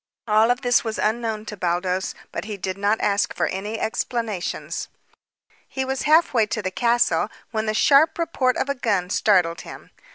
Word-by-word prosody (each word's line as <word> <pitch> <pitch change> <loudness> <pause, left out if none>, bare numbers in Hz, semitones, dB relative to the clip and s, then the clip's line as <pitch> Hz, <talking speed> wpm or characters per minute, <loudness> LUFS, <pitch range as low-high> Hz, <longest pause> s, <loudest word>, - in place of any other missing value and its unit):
All 215 +1 +4
of 245 +2 +1
this 245 -3 +3
was 220 -2 -3
unknown 220 -1 -1
to 210 - -6
Baldos, 180 0 -1 0.2
but - - -5
he 210 -2 -5
did 185 0 -3
not 205 +2 +1
ask 200 0 +1
for - - +1
any 210 +4 -4
explanations. 220 -4 -3 0.8
He 265 -1 -3
was 265 0 -2
half 320 0 +5
way 225 -4 +3
to 215 0 -3
the 185 - -2
castle 240 +3 +2 0.2
when 220 -1 -2
the 215 - 0
sharp 280 +7 +4
report 295 -7 0
of - - -1
a 280 - 0
gun 200 -8 -1
startled 180 -5 +2
him. - - -11
220 Hz, 185 wpm, -23 LUFS, 200-245 Hz, 0.8 s, half